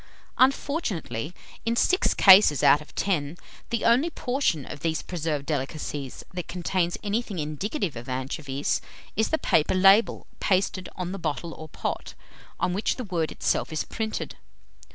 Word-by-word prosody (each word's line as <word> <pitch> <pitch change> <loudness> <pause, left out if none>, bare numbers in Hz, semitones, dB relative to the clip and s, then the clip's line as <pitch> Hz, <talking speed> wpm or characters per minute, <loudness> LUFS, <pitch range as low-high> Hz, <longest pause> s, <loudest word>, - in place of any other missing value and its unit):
Unfortunately, 255 - 0 0.3
in 230 0 0
six 370 +10 +2
cases 190 - +7
out 145 - +6
of 150 - -15
ten, 165 -5 -1 0.3
the 230 -1 -1
only 250 +8 +4
portion 250 - -1
of 145 - -8
these 160 +1 -1
preserved 155 -5 -3
delicacies, 145 -2 -4
that 180 -1 -5
contains 175 0 -1
anything 210 -1 -2
indicative 160 - -3
of 120 +3 -8
anchovies, 135 +2 -2 0.3
is 220 - +1
the 315 - +2
paper 155 - +2
label 195 +4 +5
pasted 185 -1 0
on 180 -1 -4
the 195 - -5
bottle 165 +1 -3
or 155 0 -10
pot, - - -4 0.4
on 180 - 0
which 200 +4 0
the 255 - -5
word 175 -7 -2
itself - - -1
is 155 - -1
printed.... 220 -1 -4
175 Hz, 150 wpm, -26 LUFS, 150-215 Hz, 0.4 s, cases